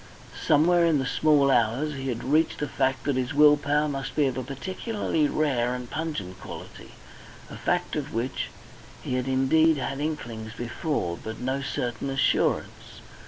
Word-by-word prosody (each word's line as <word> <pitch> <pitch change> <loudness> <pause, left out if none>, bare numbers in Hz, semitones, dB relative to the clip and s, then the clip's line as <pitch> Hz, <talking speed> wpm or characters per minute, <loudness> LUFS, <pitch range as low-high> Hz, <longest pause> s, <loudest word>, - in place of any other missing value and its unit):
Somewhere 170 +4 +5
in 165 -3 +4
the 135 - -1
small 140 +1 +3
hours 125 +5 +2
he 135 -1 -5
had 120 -3 -3
reached 155 +5 +2
the 150 - -2
fact 130 -1 0
that 140 -2 0
his 130 +2 -2
will 150 0 +7
power 145 +1 +1
must 135 -2 -4
be 150 - +3
of 130 -2 0
a 130 - -2
particularly 165 - -2
rare 125 -6 0
and 125 -1 -6
pungent 105 - -4
quality, - - -10 0.6
a - - -7
fact - - -1
of - - -3
which 120 +4 -2 0.6
he - - -3
had 125 0 -1
indeed 145 +5 +3
had 135 0 -3
inklings 120 -8 -4
before, 120 - -2
but 110 0 -6
no 130 +2 -2
certain 125 -1 -3
assurance. 135 -1 0
135 Hz, 165 wpm, -26 LUFS, 125-150 Hz, 0.6 s, will